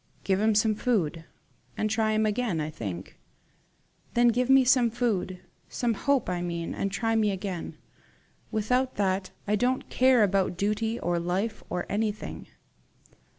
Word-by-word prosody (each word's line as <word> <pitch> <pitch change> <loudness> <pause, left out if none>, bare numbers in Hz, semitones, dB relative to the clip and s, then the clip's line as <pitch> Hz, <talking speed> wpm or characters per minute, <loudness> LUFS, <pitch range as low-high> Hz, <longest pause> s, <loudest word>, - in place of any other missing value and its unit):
"Give 190 0 +1
him 220 0 +3
some 215 +1 +3
food, 180 -8 -1 0.5
and 215 - +1
try 220 0 +1
him 215 0 +2
again, 215 -5 0
I 155 0 -3
think." 95 - -7 1.0
"Then 240 0 +5
give 250 +2 +1
me 270 0 +7
some 250 -2 +4
food 215 -6 -1 0.3
some 240 -2 0
hope, 270 +4 +1
I 180 -1 -2
mean, 170 -1 -3
and 195 - -2
try 225 +2 0
me 215 -2 +3
again. 190 -3 -4 0.7
Without 250 +4 0
that, 190 -1 0 0.2
I 210 - +2
don't 250 +4 0
care 255 -3 +5
about 195 -3 +1
duty 215 +4 -1
or 175 0 0
life 190 +6 -2
or 180 0 -2
anything." 215 0 -3
210 Hz, 150 wpm, -27 LUFS, 185-235 Hz, 1.0 s, me